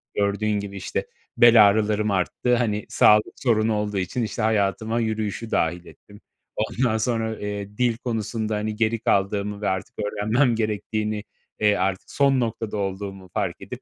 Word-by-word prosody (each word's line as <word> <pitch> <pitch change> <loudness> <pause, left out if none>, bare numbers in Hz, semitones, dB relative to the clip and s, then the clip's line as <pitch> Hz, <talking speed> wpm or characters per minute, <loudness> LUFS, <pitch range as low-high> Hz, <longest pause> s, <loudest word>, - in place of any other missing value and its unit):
gördüğün 105 +1 0
gibi, 100 0 -7
işte, - - -3 0.3
bel 115 -3 +8
ağrılarım 105 0 +1
arttı, 100 +6 +1
hani, 105 -3 -1
sağlık 105 0 +4
sorunu 110 -3 +1
olduğu 105 -1 -2
için 95 +6 -2
işte 110 - -3
hayatıma 110 +1 +1
yürüyüşü 110 0 -2
dâhil 85 +2 0
ettim. 105 0 -16 0.3
Ondan 110 +1 0
sonra, 110 -1 -1
eee, 105 0 -5
dil 120 -2 +1
konusunda, 110 -2 -3
hani, 105 0 -2
geri 115 +1 0
kaldığımı 100 +1 0
ve - - 0
artık 95 -1 -4
öğrenmem 110 +5 +1
gerektiğini, 110 0 -2 0.4
eee, 105 -1 +4
artık 95 -1 -2
son 140 -2 +3
noktada 115 -2 -2
olduğumu 95 -1 -5
fark - - -2
edip - - -8
105 Hz, 150 wpm, -24 LUFS, 100-115 Hz, 0.4 s, bel